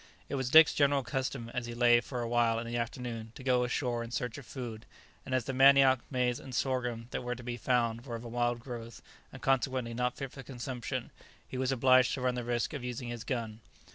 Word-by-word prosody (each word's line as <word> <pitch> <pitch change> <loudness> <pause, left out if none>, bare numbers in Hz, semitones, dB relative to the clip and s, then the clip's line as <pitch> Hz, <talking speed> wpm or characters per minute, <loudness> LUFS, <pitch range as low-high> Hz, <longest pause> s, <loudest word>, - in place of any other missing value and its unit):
It - - -5
was 130 -2 -1
Dick's 160 +2 +8
general 140 -1 +3
custom, 130 -2 -3
as 120 -1 -3
he 120 - -6
lay 120 0 +6
to - - +1
for 125 -1 -4
a - - -2
while 115 -1 +2
in 115 - -3
the 120 +1 -4
afternoon, 115 -2 -4
to - - -10
go 125 -1 +3
ashore 125 -1 -1
in 115 - -7
search 120 +1 -3
of 140 - -13
food, 120 -4 -7 0.4
and 130 - 0
as 125 -3 0
the 135 - -3
manioc, 135 0 +6
maize, 125 -2 0
and 130 -2 -8
sorghum 125 -3 -1
that - - -2
were 125 0 -3
to 125 - -10
be 120 0 -3
found 120 -1 0
were 120 - -4
of 115 - -7
a - - -7
wild 120 0 0
growth 115 -2 -8 0.3
and - - -11
consequently 130 -2 +1
not 125 +1 -1
fit 135 -2 -5
for 135 - -9
consumption, 125 -1 -5 0.4
he - - -8
was 130 0 +1
obliged 130 0 +4
to 135 - -6
run 125 0 +1
the 125 0 -3
risk 120 -1 -1
of 140 -4 -5
using 125 0 -4
his 120 -1 -5
gun. 115 -4 -3
125 Hz, 240 wpm, -31 LUFS, 120-130 Hz, 0.4 s, Dick's